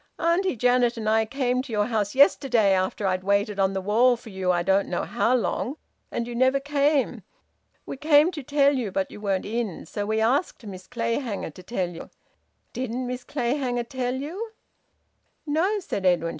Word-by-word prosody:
Auntie 345 +1 +1
Janet 245 0 +2
and 220 -1 -4
I 220 +1 +3
came 250 +1 0
to 260 -2 -10
your 210 -1 +1
house 215 -1 -1
yesterday, 255 -6 +4
after 190 +2 -1
I'd 185 -1 0
waited 200 +1 +1
on 195 0 +2
the 190 - -2
wall 235 +5 +3
for 230 -2 -12
you 190 -1 0
I 175 -1 +1
don't 195 +2 +2
know - - -1
how 240 +3 +1
long, 255 +3 -1 0.3
and 235 - -3
you 240 - -6
never 260 +3 +3
came. 285 0 +1 0.6
We - - -6
came 300 +3 +4
to 310 -4 -6
tell 285 +1 +3
you, 235 -7 -2
but 190 0 -2
you 210 - -10
weren't 195 -3 -1
in. 220 -4 -3
So 205 +5 -4
we 220 +1 0
asked 245 +2 0
Miss 185 -2 -9
Clayhanger 230 - -2
to 185 - -13
tell 185 -2 -2
you. 165 - -9 0.6
Didn't 255 0 -3
Miss 250 0 -5
Clayhanger 245 -2 -1
tell 255 -1 -2
you?" 360 - -5 0.9
"No," 340 +8 +1
said 275 - -4
Edwin. 175 -3 +2
240 Hz, 185 wpm, -25 LUFS, 200-270 Hz, 0.9 s, yesterday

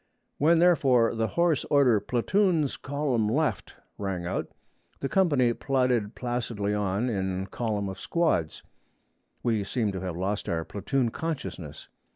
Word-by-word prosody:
When 165 +4 +5
therefore 135 -10 +4
the 110 -1 0
hoarse 170 -1 +1
order, 135 -7 +4
'Platoons 160 - +1
column 140 -6 -1
left,' 105 - -1 0.2
rang 95 -4 -3
out, 90 - -2 0.5
the 135 - -2
company 140 -10 +3
plodded 125 -5 0
placidly 120 -4 -2
on 105 +3 0
in 95 -4 -2
column 105 0 -2
of 95 0 -6
squads. 160 - 0 0.8
We 110 -4 +1
seemed 105 0 -1
to 95 - -4
have 90 -3 -4
lost 100 +3 -2
our 80 -1 -1
platoon 115 +5 -1
consciousness. 130 - -5
115 Hz, 135 wpm, -27 LUFS, 100-140 Hz, 0.8 s, When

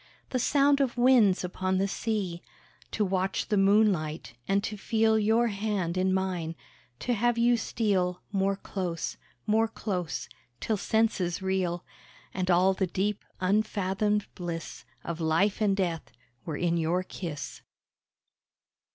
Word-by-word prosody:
The 255 - 0
sound 280 +2 +3
of 255 -3 0
winds 240 -7 +5
upon 185 +1 -1
the 195 +1 +1
sea, 195 -4 -2 0.5
To 210 - 0
watch 190 +1 -1
the 215 - +2
moonlight, 195 - +2
and 200 +1 +2
to 210 - -3
feel 220 +1 +2
Your 225 +3 +3
hand 200 -4 -2
in 185 0 +2
mine; 185 -4 -1 0.5
to 245 - 0
have 240 +1 +1
you 240 +1 +4
steal 190 -6 0
More 195 0 +1
close, 180 -4 -4 0.3
more 225 +1 +3
close, 180 -7 -3 0.3
till 220 - 0
senses 195 -4 0
reel, 185 -2 -1 0.5
And 185 0 -2
all 185 +2 +5
the 190 0 -1
deep, 200 +3 -1 0.2
unfathomed 205 +1 +1
bliss 170 -2 -6 0.2
Of 170 0 -4
Life 165 +7 +2
and 200 -2 +2
Death 175 -4 -2 0.3
were 155 -3 -3
in 170 -1 +1
your 170 +3 +1
kiss. 155 -8 -6
195 Hz, 135 wpm, -28 LUFS, 180-215 Hz, 0.5 s, winds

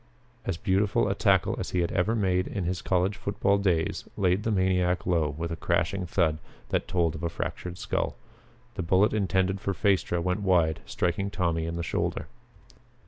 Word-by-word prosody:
As 95 - -1
beautiful 100 0 +1
a - - +1
tackle - - +2
as - - -3
he 90 - 0
had 85 - -1
ever 95 +5 +1
made 95 -4 +1
in 100 - -3
his 90 +1 -2
college 95 +2 +1
football 100 -3 +1
days 90 -5 0
laid 95 0 +2
the 115 - -1
maniac 90 -2 +1
low 85 -4 +2
with 80 +3 -4
a - - -2
crashing 95 +2 0
thud 80 -4 +1 0.3
that - - 0
told 85 -3 +1
of 80 - -7
a 85 - -1
fractured 90 +1 -5
skull. - - -2 0.6
The 95 - -3
bullet 95 +5 +3
intended 95 -2 +1
for 100 -2 -2
Phaestra 95 -3 +1
went 90 +3 0
wide, 85 -5 +2
striking 90 +3 -1
Tommy 85 -5 -1
in 85 - -3
the 85 - -3
shoulder. 80 - -2
90 Hz, 185 wpm, -27 LUFS, 85-100 Hz, 0.6 s, bullet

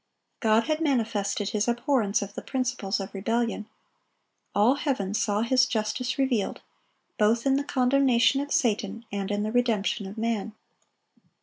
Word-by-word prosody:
God 220 0 +3
had 310 +3 -1
manifested 220 -8 0
His 210 +1 -1
abhorrence 240 -4 +1
of 200 0 -9
the - - -6
principles 250 -6 -2
of 195 - -6
rebellion. 225 +2 -1 0.9
All 215 +5 +5
heaven 270 - -2
saw 210 -1 0
His 255 +1 +3
justice 245 +3 -2
revealed, 260 -7 0 0.6
both 225 +3 +2
in 270 0 +3
the 280 - 0
condemnation 265 -1 +3
of 285 0 -6
Satan 225 -1 0
and 200 -1 -3
in 205 0 -1
the 215 - -2
redemption 220 -4 0
of 200 +3 -9
man. 220 -1 -2
230 Hz, 145 wpm, -26 LUFS, 205-255 Hz, 0.9 s, All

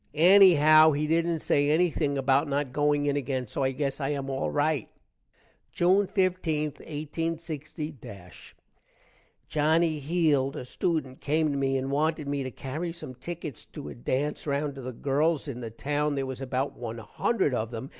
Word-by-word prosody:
ennyhow 160 -3 +7
he 150 - 0
dident 165 +1 +1
say 145 0 +2
ennything 155 -3 +1
about 135 +2 +2
not 140 -2 -2
going 145 0 +2
in 145 -1 +1
again, 130 -2 -2
so 130 - -4
i 130 - +2
gess 135 +1 -3
i 135 - -1
am 140 -2 -3
all 135 - -1
rite. 145 -3 0 0.8
June 190 +3 +3
15, 180 -6 0
186 150 - -6 0.9
Johnny 155 +1 +2
Heeld, 145 -3 +1
a - - -6
student, 135 -2 -2
came 155 +1 +1
to - - -2
me 135 0 +1
and 135 +1 -3
wanted 155 +1 0
me 140 0 -1
to 130 - -3
carry 150 +7 -5
some 165 -6 -8
tickets 155 +2 -7
to 75 - -9
a - - -7
dance 130 - -2
round 140 0 -1
to 135 - -9
the 130 0 -5
girls 145 +5 0
in 125 -3 -5
the 115 - -5
town. 145 +5 -1
there 135 -1 -1
was 130 0 -6
about 135 +1 -2
1 115 -1 -6
hundred 145 - -1
of 110 -2 -1
them. 120 +2 -6
145 Hz, 170 wpm, -27 LUFS, 135-160 Hz, 0.9 s, ennyhow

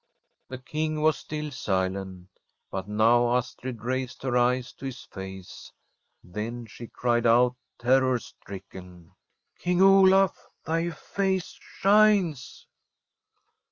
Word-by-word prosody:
The 130 - -6
King 155 +4 -3
was 155 -1 +4
still 150 -1 -6
silent, 95 -5 -3 0.4
but 95 0 -4
now 120 +3 +3
Astrid 125 -2 -4
raised 130 +1 -3
her 130 -2 -1
eyes 125 0 +1
to - - -11
his 125 -2 -7
face; 95 -1 -10 0.5
then 115 +6 -6
she 115 +2 -10
cried 120 0 0
out, 120 +2 +4 0.2
terror 130 +1 +3
stricken: 90 -5 -12 0.2
' - - -45
King 180 0 0
Olaf, 195 0 +5 0.2
thy 165 +2 0
face 190 +1 -2
shines.' 195 -9 +2
125 Hz, 115 wpm, -26 LUFS, 105-155 Hz, 0.5 s, Olaf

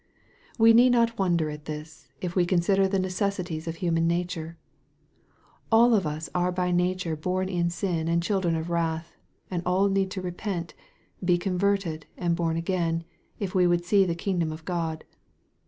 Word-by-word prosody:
We 225 0 +7
need 245 +2 +6
not 230 -2 +2
wonder 170 -5 +1
at 150 0 -9
this, 150 0 -8
if 180 -1 -4
we 180 - +4
consider 190 +2 +2
the 195 +1 0
ne 185 0 0
cessities 185 -4 -2
of 165 - -3
human 165 -1 +1
nature. 170 -1 -2 1.1
All 235 +2 +6
of 195 -7 +2
us 155 +2 -4
are 180 0 +1
by 180 0 -1
nature 180 -1 0
born 185 +4 -2
in 175 -2 0
sin 170 -2 -2
and 170 0 +1
children 185 -3 +1
of 160 +1 -3
wrath, 165 0 -2 0.4
and 175 -2 -1
all 185 +3 +2
need 195 -1 +1
to 190 0 -5
repent, 180 -1 -4 0.5
be 175 -1 +3
converted, 185 -3 -1
and 175 -2 0
born 165 -1 0
again, 165 -1 -1 0.3
if 195 -3 -4
we 180 -1 +4
would 175 0 +1
see 195 +2 +4
the 170 -3 -1
kingdom 170 -3 -1
of 160 +1 -9
God. 165 -3 -2
175 Hz, 175 wpm, -26 LUFS, 165-190 Hz, 1.1 s, We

